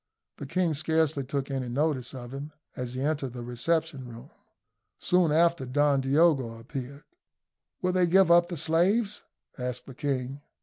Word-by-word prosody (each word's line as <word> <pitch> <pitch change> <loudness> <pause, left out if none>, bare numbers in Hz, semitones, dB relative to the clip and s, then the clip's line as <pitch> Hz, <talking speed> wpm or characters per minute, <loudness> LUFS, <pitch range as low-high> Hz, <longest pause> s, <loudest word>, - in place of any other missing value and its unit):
The 140 - -7
king 175 +1 +1
scarcely 155 -1 +1
took 140 +1 -3
any 130 -2 -2
notice 135 -1 -1
of 120 0 -8
him 145 +2 -7 0.2
as 125 0 -5
he 130 - -3
entered 145 -3 -1
the 120 -1 -6
reception 140 +3 -1
room. 115 -1 -11 0.7
Soon 180 -3 +2
after 170 -1 +3
Don 140 +2 +2
Diogo 135 -4 +2
appeared. 135 +4 -7 0.8
"Will 180 - +2
they 180 -1 +3
give 185 0 +5
up 175 0 +5
the 175 - -4
slaves?" 180 +8 +1 0.4
asked 125 0 -4
the 135 - -10
king. 135 0 -3
145 Hz, 160 wpm, -28 LUFS, 130-165 Hz, 0.8 s, give